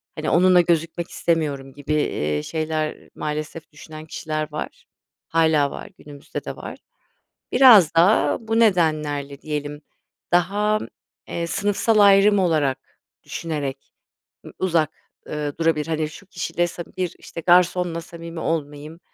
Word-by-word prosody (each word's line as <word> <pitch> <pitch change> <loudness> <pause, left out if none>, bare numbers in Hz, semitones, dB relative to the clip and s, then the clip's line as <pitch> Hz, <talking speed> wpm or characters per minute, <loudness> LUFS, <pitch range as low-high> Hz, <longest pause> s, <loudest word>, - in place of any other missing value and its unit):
hani, 155 - -3
onunla 180 +1 +5
gözükmek 170 0 -1
istemiyorum 145 -5 -1
gibi, 145 +2 -4
eee, 75 - -1
şeyler, 155 - -3
maalesef 155 +2 -5
düşünen 155 +1 -11
kişiler 155 -1 -4
var. 150 - -7 0.4
Hâlâ 160 -3 +2
var, - - -8
günümüzde 145 -1 -9
de - - -5
var. - - -8 0.8
Biraz 215 - +7
da, 175 +6 +4
bu 225 0 -1
nedenlerle 150 -8 +1
diyelim, 150 -1 -5 0.5
daha, 205 +5 +2 0.5
eee, 170 0 -3
sınıfsal 205 +4 +1
ayrım 200 0 +6
olarak 155 -7 +1 0.4
düşünerek 145 -5 -5 0.5
ı - - -10
uzak, 165 -5 +1 0.4
ııı, 150 -1 -4
durabilir. 165 -2 +1
Hani, 155 -1 -1
şu 175 - -13
kişiyle 175 -1 -2
sam 170 0 -7
bir, 180 -2 -2
işte, 165 - -9
garsonla 175 -1 +3
samimi 165 0 -9
olmayayım, 150 0 -4
160 Hz, 125 wpm, -22 LUFS, 150-175 Hz, 0.8 s, Biraz